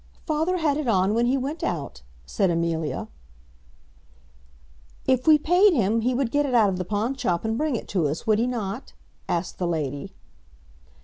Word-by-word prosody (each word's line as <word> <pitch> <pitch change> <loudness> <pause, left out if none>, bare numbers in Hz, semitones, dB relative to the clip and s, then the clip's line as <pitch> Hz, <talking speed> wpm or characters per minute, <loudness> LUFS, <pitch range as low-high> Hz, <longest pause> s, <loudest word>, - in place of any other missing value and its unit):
"Father 320 +4 0
had 300 -4 +1
it 305 -4 -3
on 195 -2 +2
when 235 +2 +2
he 265 +2 +2
went 280 +5 -4
out," 145 - -3 0.2
said 190 - 0
Amelia. 165 -2 -1 2.0
"If 260 +2 +1
we 310 -1 +8
paid 360 +6 +4
him 225 - +1
he 250 +2 0
would 250 -2 0
get 290 0 +2
it 255 - 0
out 220 -4 +5
of 185 -1 -3
the 185 - -2
pawnshop, 215 -2 -1
and 220 0 0
bring 300 +1 0
it - - -5
to 175 -6 +1
us, 150 +4 -4
would 215 -1 +3
he 240 - +1
not?" 230 -1 -4 0.4
asked 175 +1 -2
the 180 - 0
lady. 145 -4 -3
225 Hz, 180 wpm, -24 LUFS, 180-275 Hz, 2.0 s, we